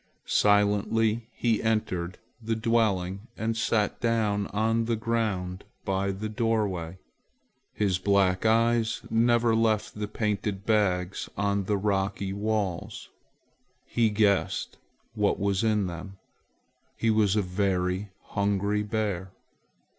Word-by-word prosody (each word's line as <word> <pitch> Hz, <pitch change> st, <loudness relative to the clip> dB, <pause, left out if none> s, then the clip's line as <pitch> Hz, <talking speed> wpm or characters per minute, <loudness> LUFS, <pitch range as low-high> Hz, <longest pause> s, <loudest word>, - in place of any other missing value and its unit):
Silently 105 Hz, +2 st, +2 dB
he 115 Hz, -2 st, 0 dB
entered 95 Hz, -6 st, -1 dB, 0.2 s
the 115 Hz, 0 st, -1 dB
dwelling 110 Hz, -3 st, 0 dB
and 110 Hz, +1 st, -1 dB
sat 110 Hz, -2 st, 0 dB
down 110 Hz, -3 st, +1 dB
on 115 Hz, +2 st, 0 dB
the 115 Hz, 0 st, 0 dB
ground 105 Hz, -5 st, -2 dB, 0.2 s
by 95 Hz, 0 st, 0 dB
the 100 Hz, +3 st, -3 dB
doorway. 105 Hz, -7 st, -1 dB, 0.7 s
His 95 Hz, -3 st, 0 dB
black 95 Hz, -1 st, +2 dB
eyes 115 Hz, 0 st, +2 dB
never 115 Hz, 0 st, +3 dB
left 110 Hz, -1 st, +1 dB
the 105 Hz, 0 st, -4 dB
painted 105 Hz, -2 st, -2 dB
bags 100 Hz, -4 st, +1 dB
on 100 Hz, 0 st, 0 dB
the 105 Hz, +1 st, +1 dB
rocky 95 Hz, -1 st, -1 dB
walls. 100 Hz, -3 st, -2 dB, 0.8 s
He 115 Hz, -2 st, +2 dB
guessed 105 Hz, -2 st, +1 dB, 0.3 s
what 105 Hz, -2 st, +1 dB
was 100 Hz, +1 st, 0 dB
in 105 Hz, -3 st, +2 dB
them. 90 Hz, +2 st, -7 dB, 0.8 s
He 115 Hz, -, +2 dB
was 105 Hz, -2 st, +3 dB
a 105 Hz, -, +2 dB
very 90 Hz, +1 st, -1 dB
hungry 100 Hz, +1 st, 0 dB
bear. 105 Hz, -3 st, -2 dB
105 Hz, 115 wpm, -27 LUFS, 95-110 Hz, 0.8 s, never